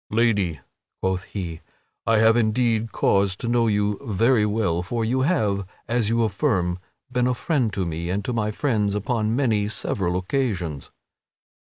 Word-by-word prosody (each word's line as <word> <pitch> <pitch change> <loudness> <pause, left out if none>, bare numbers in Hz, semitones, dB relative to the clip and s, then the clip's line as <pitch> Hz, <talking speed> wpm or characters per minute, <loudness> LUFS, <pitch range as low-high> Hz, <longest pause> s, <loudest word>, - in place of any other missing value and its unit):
"Lady," 105 - +1 0.4
quoth 95 0 -1
he, 85 -5 -6 0.5
"I 115 -1 +4
have 110 +1 +5
indeed 115 -1 +1
cause 100 -1 +2
to 115 - -5
know 120 -1 +2
you 105 -1 +1
very 115 0 +2
well, 100 -6 0
for 115 +5 -2
you 130 +4 +1
have, 105 - +1 0.2
as 115 -2 +1
you 115 0 +2
affirm, 95 -4 0 0.3
been 125 0 +1
a 125 - +1
friend 130 -6 0
to 95 -2 -1
me 85 +1 -4
and 100 +2 -2
to 125 - -2
my 110 -2 0
friends 105 -4 0
upon 110 +1 0
many 110 -6 +1
several 95 -4 -1
occasions." 90 - -2
105 Hz, 160 wpm, -24 LUFS, 95-115 Hz, 0.5 s, have